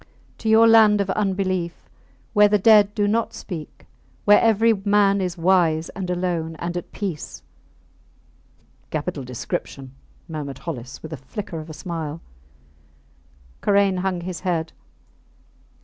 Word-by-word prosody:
To 220 Hz, -, -2 dB
your 225 Hz, +1 st, +6 dB
land 220 Hz, -2 st, +6 dB
of 195 Hz, -1 st, 0 dB
unbelief, 185 Hz, -4 st, -2 dB, 0.5 s
where 210 Hz, -1 st, +6 dB
the 210 Hz, 0 st, +3 dB
dead 210 Hz, 0 st, +5 dB
do 205 Hz, -1 st, +1 dB
not 225 Hz, +2 st, 0 dB
speak, 165 Hz, -6 st, -8 dB, 0.4 s
where 205 Hz, 0 st, +6 dB
every 225 Hz, 0 st, +4 dB
man 200 Hz, -1 st, +2 dB
is 180 Hz, -1 st, -3 dB
wise, 165 Hz, -2 st, +2 dB
and 190 Hz, -2 st, -6 dB
alone 175 Hz, -3 st, -2 dB
and 170 Hz, +2 st, -5 dB
at 175 Hz, -, -5 dB
peace! 190 Hz, -7 st, -6 dB, 1.5 s
Capital 155 Hz, -1 st, -3 dB
description, 130 Hz, +1 st, -6 dB, 0.3 s
murmured 145 Hz, -4 st, -6 dB
Hollis, 130 Hz, -4 st, -7 dB
with 160 Hz, -, -8 dB
the 155 Hz, -, -5 dB
flicker 165 Hz, +6 st, -7 dB
of 155 Hz, +1 st, -9 dB
a -, -, -7 dB
smile. 160 Hz, -2 st, -5 dB, 1.4 s
Karain 200 Hz, -2 st, +3 dB
hung 185 Hz, -1 st, -2 dB
his 180 Hz, -1 st, -5 dB
head. 170 Hz, -3 st, -2 dB
180 Hz, 135 wpm, -22 LUFS, 160-205 Hz, 1.5 s, your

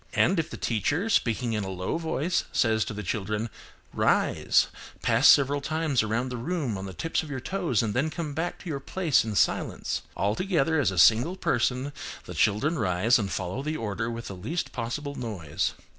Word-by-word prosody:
And, 185 Hz, 0 st, +3 dB
if 160 Hz, -, -1 dB
the -, -, -7 dB
teacher, 145 Hz, -, 0 dB
speaking 115 Hz, -, +1 dB
in 105 Hz, -2 st, -1 dB
a 95 Hz, -, -4 dB
low 95 Hz, -, -2 dB
voice, 165 Hz, +1 st, -1 dB
says 110 Hz, -3 st, +2 dB
to -, -, -5 dB
the 105 Hz, -, -5 dB
children, 105 Hz, +3 st, -2 dB, 0.4 s
"Rise, -, -, +3 dB, 0.4 s
pass 120 Hz, +3 st, +4 dB
several 140 Hz, 0 st, +5 dB
times 155 Hz, -3 st, +1 dB
around 115 Hz, +4 st, -1 dB
the 125 Hz, -, -4 dB
room 145 Hz, -, -2 dB
on 95 Hz, 0 st, -5 dB
the 95 Hz, -, -7 dB
tips 165 Hz, -, -1 dB
of 155 Hz, -, -9 dB
your 135 Hz, -2 st, -3 dB
toes 165 Hz, -, 0 dB
and 105 Hz, -2 st, -1 dB
then 140 Hz, +7 st, +1 dB
come 155 Hz, -2 st, -4 dB
back 165 Hz, +4 st, -2 dB
to -, -, -10 dB
your 145 Hz, -4 st, -2 dB
place 160 Hz, +1 st, +1 dB
in 110 Hz, -2 st, -4 dB
silence" -, -, 0 dB, 0.2 s
all 100 Hz, +1 st, +1 dB
together, 160 Hz, -, +1 dB
as 130 Hz, -, +3 dB
a 95 Hz, -, -5 dB
single 115 Hz, -, +5 dB
person, 135 Hz, -5 st, 0 dB, 0.3 s
the -, -, -7 dB
children 140 Hz, +11 st, +1 dB
rise, 105 Hz, +4 st, +3 dB
and 100 Hz, -3 st, -2 dB
follow 95 Hz, +7 st, -3 dB
the 155 Hz, +2 st, -2 dB
order 115 Hz, +1 st, -3 dB
with 115 Hz, 0 st, -5 dB
the 95 Hz, -, -6 dB
least 160 Hz, -, -3 dB
possible 135 Hz, +5 st, -4 dB
noise. 100 Hz, -, -3 dB
125 Hz, 200 wpm, -27 LUFS, 110-155 Hz, 0.4 s, several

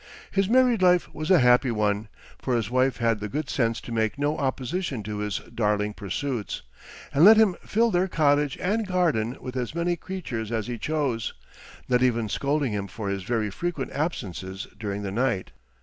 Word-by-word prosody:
His 195 Hz, 0 st, +1 dB
married 250 Hz, -3 st, +4 dB
life 180 Hz, -1 st, +3 dB
was 155 Hz, +1 st, -4 dB
a 185 Hz, -, +7 dB
happy 125 Hz, -1 st, +5 dB
one, 105 Hz, -1 st, 0 dB, 0.3 s
for 125 Hz, -, -1 dB
his 115 Hz, -1 st, -1 dB
wife 130 Hz, +1 st, +2 dB
had 115 Hz, -2 st, +1 dB
the 105 Hz, 0 st, -4 dB
good 150 Hz, +5 st, -3 dB
sense 115 Hz, -4 st, +1 dB
to -, -, -9 dB
make 110 Hz, 0 st, 0 dB
no 145 Hz, +2 st, 0 dB
opposition 135 Hz, -, -2 dB
to 105 Hz, 0 st, -4 dB
his 105 Hz, -4 st, -2 dB, 0.2 s
darling 105 Hz, -1 st, 0 dB
pursuits, 110 Hz, +3 st, -4 dB, 0.5 s
and 145 Hz, -, +4 dB
let 215 Hz, +3 st, +9 dB
him 215 Hz, -5 st, +5 dB
fill 230 Hz, +2 st, +2 dB
their 180 Hz, 0 st, +2 dB
cottage 145 Hz, -4 st, +2 dB
and 210 Hz, +3 st, 0 dB
garden 155 Hz, -, +1 dB
with 125 Hz, -1 st, -7 dB
as 125 Hz, +4 st, -3 dB
many 170 Hz, +1 st, +1 dB
creatures 140 Hz, -, -5 dB
as 110 Hz, -3 st, -1 dB
he 120 Hz, 0 st, -5 dB
chose, 140 Hz, -7 st, -1 dB, 0.5 s
not 125 Hz, -1 st, +2 dB
even 120 Hz, -4 st, +2 dB
scolding 140 Hz, +2 st, 0 dB
him 100 Hz, -1 st, -2 dB
for 100 Hz, +1 st, -5 dB
his 100 Hz, 0 st, -2 dB
very 110 Hz, +1 st, -1 dB
frequent 170 Hz, -, -3 dB
absences 95 Hz, -, -4 dB
during 105 Hz, -2 st, -3 dB
the 100 Hz, -, -3 dB
night. 115 Hz, -3 st, 0 dB
125 Hz, 185 wpm, -26 LUFS, 110-160 Hz, 0.5 s, let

